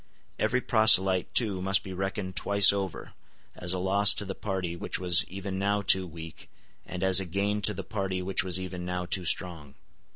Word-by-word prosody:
Every 125 Hz, +1 st, 0 dB
proselyte 95 Hz, -6 st, +3 dB
too 100 Hz, -6 st, +1 dB
must 95 Hz, +1 st, +2 dB
be 95 Hz, -, -8 dB
reckoned 95 Hz, 0 st, -5 dB
twice 100 Hz, +4 st, +4 dB
over, 95 Hz, -3 st, -6 dB, 0.4 s
as 90 Hz, -, -3 dB
a 95 Hz, -, -1 dB
loss 100 Hz, +3 st, +4 dB
to 105 Hz, -, -4 dB
the 95 Hz, -, -5 dB
party 95 Hz, -4 st, -5 dB
which -, -, -4 dB
was 90 Hz, +1 st, +3 dB
even 95 Hz, 0 st, -6 dB
now 100 Hz, +1 st, -1 dB
too 95 Hz, -1 st, +3 dB
weak, 80 Hz, -1 st, -11 dB, 0.4 s
and 90 Hz, 0 st, -6 dB
as 95 Hz, -1 st, +5 dB
a 95 Hz, -, -4 dB
gain 100 Hz, +4 st, -2 dB
to 105 Hz, -, -1 dB
the -, -, -6 dB
party 95 Hz, -3 st, -4 dB
which 95 Hz, -1 st, -1 dB
was 95 Hz, -1 st, -2 dB
even 90 Hz, -1 st, -7 dB
now 90 Hz, 0 st, -4 dB
too 90 Hz, 0 st, -3 dB
strong. 80 Hz, -5 st, 0 dB
95 Hz, 195 wpm, -27 LUFS, 90-100 Hz, 0.4 s, as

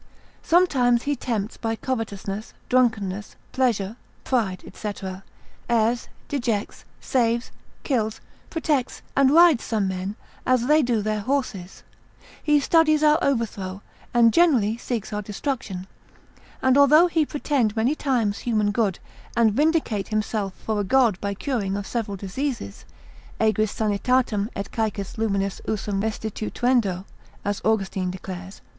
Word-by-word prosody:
Sometimes 260 Hz, -9 st, +3 dB
he 290 Hz, 0 st, 0 dB
tempts 225 Hz, -5 st, -3 dB
by 225 Hz, -1 st, -2 dB
covetousness, 215 Hz, -4 st, -4 dB
drunkenness, 210 Hz, -6 st, +1 dB, 0.2 s
pleasure, 230 Hz, -5 st, 0 dB, 0.3 s
pride, 210 Hz, -8 st, 0 dB
&c., 210 Hz, -, -4 dB, 0.8 s
errs, 235 Hz, +1 st, +2 dB, 0.2 s
dejects, 235 Hz, -7 st, -2 dB
saves, 235 Hz, -1 st, 0 dB, 0.3 s
kills, 220 Hz, -6 st, 0 dB, 0.3 s
protects, 300 Hz, -6 st, -1 dB
and 275 Hz, -1 st, +5 dB
rides 325 Hz, -3 st, +6 dB
some 215 Hz, -4 st, 0 dB
men, 190 Hz, +2 st, -3 dB, 0.3 s
as 255 Hz, -2 st, +2 dB
they 305 Hz, +3 st, +5 dB
do 240 Hz, -5 st, +1 dB
their 215 Hz, 0 st, -1 dB
horses. 210 Hz, -7 st, -3 dB, 0.6 s
He 295 Hz, -1 st, +4 dB
studies 310 Hz, +1 st, +3 dB
our 305 Hz, +1 st, +5 dB
overthrow, 205 Hz, -7 st, -1 dB, 0.3 s
and 230 Hz, -2 st, +5 dB
generally 255 Hz, -12 st, +4 dB
seeks 235 Hz, -3 st, -4 dB
our 210 Hz, -, -1 dB
destruction; 210 Hz, -3 st, -4 dB, 0.8 s
and 260 Hz, +1 st, +5 dB
although 300 Hz, +4 st, +7 dB
he 330 Hz, -3 st, +2 dB
pretend 280 Hz, -7 st, 0 dB
many 230 Hz, +6 st, +2 dB
times 245 Hz, -9 st, 0 dB
human 215 Hz, -3 st, +1 dB
good, 205 Hz, -5 st, 0 dB, 0.4 s
and 225 Hz, -3 st, +4 dB
vindicate 295 Hz, -7 st, +1 dB
himself 215 Hz, -3 st, -2 dB
for 215 Hz, -1 st, -3 dB
a -, -, +1 dB
god 225 Hz, -2 st, +3 dB
by 200 Hz, 0 st, -2 dB
curing 200 Hz, -5 st, -2 dB
of 205 Hz, -, -4 dB
several 210 Hz, -4 st, -3 dB
diseases, 200 Hz, -, -4 dB, 0.5 s
aegris 215 Hz, -1 st, +2 dB
sanitatem, 215 Hz, 0 st, +1 dB
et 200 Hz, -, -5 dB
caecis 215 Hz, -3 st, -3 dB
luminis 200 Hz, -3 st, -1 dB
usum 205 Hz, -2 st, -1 dB
restituendo, 220 Hz, -2 st, -1 dB, 0.4 s
as 205 Hz, 0 st, -1 dB
Austin 195 Hz, -4 st, 0 dB
declares, 185 Hz, +1 st, -7 dB
lib. -, -, -22 dB
225 Hz, 130 wpm, -24 LUFS, 200-260 Hz, 0.8 s, although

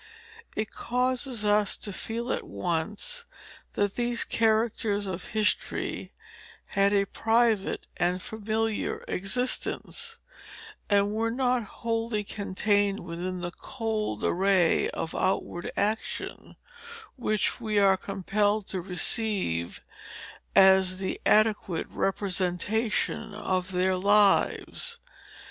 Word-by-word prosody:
It 215 Hz, 0 st, -2 dB
causes 250 Hz, -2 st, -1 dB
us 210 Hz, -1 st, +3 dB
to 205 Hz, -, -5 dB
feel 235 Hz, +5 st, -3 dB
at -, -, -4 dB
once, 175 Hz, -, -3 dB, 0.5 s
that 205 Hz, -1 st, 0 dB
these 240 Hz, -1 st, 0 dB
characters 220 Hz, -2 st, +1 dB
of 185 Hz, -2 st, -4 dB
history 215 Hz, -1 st, -1 dB, 0.6 s
had 195 Hz, 0 st, +4 dB
a 200 Hz, -1 st, +3 dB
private 225 Hz, -1 st, +1 dB
and 180 Hz, +1 st, +1 dB
familiar 220 Hz, +2 st, -2 dB
existence, 250 Hz, -, -2 dB, 0.7 s
and 200 Hz, 0 st, +3 dB
were 225 Hz, +1 st, 0 dB
not 250 Hz, -1 st, +1 dB, 0.2 s
wholly 225 Hz, -2 st, -1 dB
contained 205 Hz, 0 st, 0 dB
within 180 Hz, +1 st, -5 dB
that 175 Hz, -1 st, -5 dB
cold 220 Hz, -, -3 dB
array 185 Hz, -2 st, +3 dB
of 160 Hz, -, -4 dB
outward 175 Hz, -2 st, -1 dB
action, 215 Hz, +2 st, -2 dB, 0.6 s
which 215 Hz, -1 st, -1 dB
we 215 Hz, -2 st, -1 dB
are 195 Hz, -1 st, +6 dB
compelled 205 Hz, +2 st, 0 dB
to 185 Hz, -, -2 dB
receive 180 Hz, -, 0 dB, 0.7 s
as 190 Hz, -1 st, +6 dB
the 190 Hz, 0 st, -3 dB
adequate 210 Hz, -5 st, +3 dB
representation 195 Hz, +3 st, -1 dB
of 185 Hz, -3 st, -1 dB
their 185 Hz, +1 st, +2 dB
lives. 205 Hz, -, +3 dB
205 Hz, 100 wpm, -28 LUFS, 190-225 Hz, 0.7 s, are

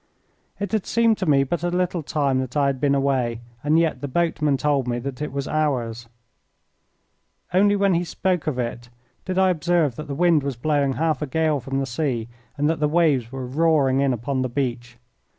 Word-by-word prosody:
It 200 Hz, -2 st, -3 dB
had 215 Hz, -4 st, -1 dB
seemed 230 Hz, -2 st, +2 dB
to 190 Hz, -, -2 dB
me 140 Hz, -2 st, +4 dB
but 160 Hz, +5 st, -2 dB
a 175 Hz, -, 0 dB
little 180 Hz, -1 st, -1 dB
time 140 Hz, -4 st, 0 dB
that 130 Hz, +1 st, -3 dB
I 145 Hz, -, +3 dB
had 135 Hz, -2 st, -1 dB
been 140 Hz, -1 st, +3 dB
away, 130 Hz, -4 st, 0 dB, 0.2 s
and 150 Hz, +2 st, +3 dB
yet 165 Hz, -1 st, +1 dB
the 145 Hz, -, -3 dB
boatman 150 Hz, -1 st, +1 dB
told 140 Hz, -3 st, 0 dB
me 120 Hz, 0 st, -1 dB
that 130 Hz, +2 st, -6 dB
it 150 Hz, -, -3 dB
was 140 Hz, +1 st, -3 dB
hours. 120 Hz, -7 st, -1 dB, 1.4 s
Only 205 Hz, +2 st, +4 dB
when 200 Hz, -1 st, +2 dB
he 170 Hz, +1 st, +1 dB
spoke 180 Hz, 0 st, -1 dB
of 145 Hz, -5 st, -1 dB
it 120 Hz, 0 st, -4 dB, 0.4 s
did 185 Hz, -1 st, -3 dB
I 190 Hz, -1 st, +4 dB
observe 170 Hz, -6 st, +1 dB
that 155 Hz, -, -6 dB
the 140 Hz, -, -4 dB
wind 170 Hz, -1 st, +3 dB
was 140 Hz, -1 st, -3 dB
blowing 140 Hz, +1 st, +1 dB
half 155 Hz, +2 st, 0 dB
a 150 Hz, -, -2 dB
gale 155 Hz, +1 st, +1 dB
from 135 Hz, +2 st, -4 dB
the 135 Hz, -, 0 dB
sea 120 Hz, -3 st, -2 dB, 0.3 s
and 145 Hz, +1 st, +1 dB
that 160 Hz, 0 st, 0 dB
the 150 Hz, -, +2 dB
waves 150 Hz, -7 st, +2 dB
were 135 Hz, -1 st, -5 dB
roaring 140 Hz, -1 st, +2 dB
in 140 Hz, -1 st, +2 dB
upon 130 Hz, +3 st, -2 dB
the 130 Hz, -, -1 dB
beach. 120 Hz, -2 st, -3 dB
145 Hz, 210 wpm, -23 LUFS, 130-165 Hz, 1.4 s, me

